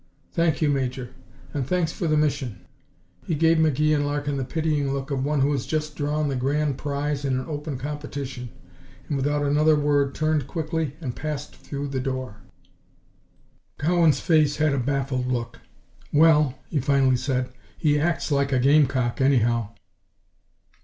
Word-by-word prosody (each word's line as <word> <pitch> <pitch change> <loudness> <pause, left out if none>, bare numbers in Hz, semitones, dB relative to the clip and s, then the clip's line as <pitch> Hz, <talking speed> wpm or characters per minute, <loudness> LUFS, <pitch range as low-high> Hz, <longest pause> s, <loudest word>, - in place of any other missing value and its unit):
"Thank 165 -2 +1
you, 150 - +3
Major. 130 -2 -2 0.4
And 135 -3 -2
thanks 175 -2 +1
for 170 - -3
the 155 -1 +2
mission." 135 -7 -1 0.6
He 165 - 0
gave 165 +2 +4
McGee 155 0 +3
and 145 -1 +2
Larkin 145 0 -1
the 135 - -1
pitying 150 -1 -1
look 135 +1 -3
of 135 -1 -1
one 145 0 +1
who 140 +2 +3
has 135 -3 -2
just 155 -1 -2
drawn 150 +1 -1
the 140 - -1
grand 140 +2 0
prize 145 0 -2
in 135 -2 0
an 130 - -5
open 150 -2 -4
competition, 140 -2 -5 0.6
and 145 - -2
without 145 +2 0
another 150 +2 +4
word 145 -2 +1
turned 155 -3 0
quickly 160 -2 -2
and 125 -6 -4
passed 150 -1 -5
through 140 0 -6
the 135 -1 -2
door. 130 -4 -4 1.4
Cowan's 165 0 +3
face 155 -3 +3
had 155 -2 +2
a 140 - +1
baffled 135 -1 -1
look. 120 -2 -3 0.5
"Well," 150 -3 +5 0.2
he 150 - +1
finally 135 -1 +3
said, 125 0 -1 0.3
"he 150 -1 +2
acts 165 0 0
like 140 0 +1
a 130 - +3
gamecock, 135 -2 +3
anyhow." 120 -5 +2
145 Hz, 160 wpm, -24 LUFS, 135-150 Hz, 1.4 s, Well